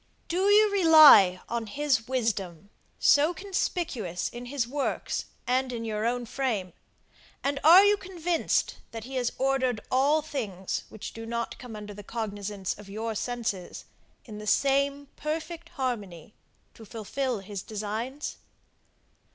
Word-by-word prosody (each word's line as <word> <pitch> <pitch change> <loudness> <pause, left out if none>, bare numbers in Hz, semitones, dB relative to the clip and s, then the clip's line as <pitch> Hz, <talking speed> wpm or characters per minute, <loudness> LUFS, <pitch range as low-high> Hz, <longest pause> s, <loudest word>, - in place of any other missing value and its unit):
Do 370 +3 +1
you 420 0 +6
rely 310 - +8
on 235 -1 -3
his 265 -1 0
wisdom, 205 -8 -2 0.3
so 300 +4 +4
conspicuous 335 - -2
in 240 +1 -8
his 255 -2 -1
works, 280 +2 -2 0.2
and 255 +1 +1
in 230 -2 -4
your 215 0 -1
own 245 0 -1
frame, 220 -8 -2 0.7
and 280 0 0
are 355 +6 +9
you 410 0 +4
convinced, 355 -3 -1
that 225 -1 -7
he 260 +3 -9
has 245 -2 0
ordered 260 -3 +1
all 285 +4 +3
things 210 - -4
which 215 - -8
do 225 0 -8
not 235 0 -4
come 245 -3 -9
under 210 -1 -8
the 205 - -9
cognizance 205 -3 -4
of 205 -1 -12
your 220 +3 -3
senses, 220 -5 -4 0.4
in 210 -3 -9
the 210 - -8
same 280 +3 +2
perfect 325 +2 -4
harmony, 210 - -4 0.4
to 225 - -14
fulfil 230 +4 -3
his 195 0 -6
designs? 220 +8 -5
245 Hz, 140 wpm, -27 LUFS, 210-285 Hz, 0.7 s, are